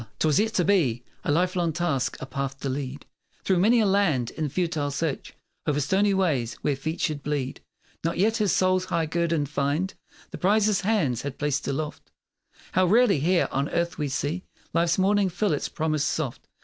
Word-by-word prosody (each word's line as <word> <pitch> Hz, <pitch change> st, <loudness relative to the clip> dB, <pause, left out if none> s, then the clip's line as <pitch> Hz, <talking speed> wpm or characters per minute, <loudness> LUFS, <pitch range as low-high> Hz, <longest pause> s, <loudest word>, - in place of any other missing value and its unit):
'Twas 155 Hz, -3 st, +3 dB
yet 220 Hz, +1 st, +1 dB
to 180 Hz, -5 st, +1 dB
be 140 Hz, -, +2 dB, 0.2 s
A -, -, 0 dB
lifelong 175 Hz, +1 st, +1 dB
task 160 Hz, -5 st, -1 dB
a -, -, -5 dB
path 135 Hz, 0 st, -4 dB
to 140 Hz, -, -2 dB
lead 135 Hz, +1 st, -4 dB, 0.4 s
Through 190 Hz, -2 st, +2 dB
many 230 Hz, +6 st, +5 dB
a -, -, +3 dB
land, 185 Hz, -, +2 dB
in 155 Hz, -2 st, -3 dB
futile 160 Hz, -3 st, -1 dB
search 140 Hz, +1 st, -3 dB, 0.3 s
O'er 145 Hz, -1 st, +2 dB
stony 190 Hz, +8 st, +2 dB
ways 150 Hz, -12 st, +1 dB
where 145 Hz, -, +1 dB
feet 160 Hz, +5 st, -4 dB
should 150 Hz, -3 st, -1 dB
bleed. 140 Hz, -2 st, -3 dB, 0.4 s
Not 165 Hz, -, -1 dB
yet 220 Hz, +5 st, +2 dB
his 210 Hz, -4 st, +2 dB
soul's 185 Hz, 0 st, +2 dB
high 165 Hz, -3 st, 0 dB
guerdon 165 Hz, -1 st, 0 dB
find 145 Hz, +6 st, -1 dB, 0.4 s
The -, -, -7 dB
prize 205 Hz, +3 st, +3 dB
his 210 Hz, -2 st, +2 dB
hands 185 Hz, -, +1 dB
had 140 Hz, -1 st, -5 dB
placed 145 Hz, -1 st, -1 dB
aloft. 150 Hz, +2 st, -4 dB, 0.6 s
How 185 Hz, 0 st, +3 dB
rarely 215 Hz, -, +4 dB
here 175 Hz, +5 st, +2 dB
on 140 Hz, +2 st, -1 dB
earth 170 Hz, 0 st, -1 dB
we 150 Hz, -, 0 dB
see 145 Hz, +7 st, -2 dB, 0.3 s
Life's 170 Hz, +1 st, +2 dB
morning 195 Hz, +1 st, +3 dB
fill 185 Hz, +1 st, 0 dB
its 145 Hz, -, -2 dB
promise 155 Hz, -2 st, -1 dB
soft. 155 Hz, -4 st, -2 dB
165 Hz, 190 wpm, -26 LUFS, 140-185 Hz, 0.6 s, many